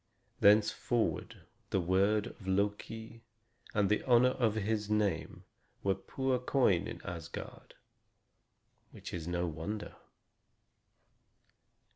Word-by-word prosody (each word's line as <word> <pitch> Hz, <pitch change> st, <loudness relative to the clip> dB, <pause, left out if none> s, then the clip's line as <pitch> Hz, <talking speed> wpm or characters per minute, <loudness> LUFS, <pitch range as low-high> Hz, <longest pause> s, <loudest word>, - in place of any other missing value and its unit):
Thenceforward 105 Hz, -3 st, +2 dB, 0.3 s
the 95 Hz, -, +1 dB
word 100 Hz, +4 st, +2 dB
of 100 Hz, -5 st, -10 dB
Loki 105 Hz, +4 st, -2 dB, 0.5 s
and 105 Hz, -2 st, +3 dB
the 105 Hz, +2 st, +2 dB
honor 125 Hz, 0 st, +5 dB
of 115 Hz, -4 st, +1 dB
his 105 Hz, 0 st, -1 dB
name 105 Hz, -6 st, 0 dB, 0.4 s
were 100 Hz, -, +3 dB
poor 130 Hz, +7 st, -1 dB
coin 125 Hz, -9 st, +2 dB
in -, -, -8 dB
Asgard; 85 Hz, -2 st, -8 dB, 1.1 s
which -, -, -9 dB
is 85 Hz, -2 st, -4 dB
no 90 Hz, 0 st, 0 dB
wonder. 85 Hz, +6 st, -5 dB
105 Hz, 100 wpm, -33 LUFS, 95-110 Hz, 1.1 s, honor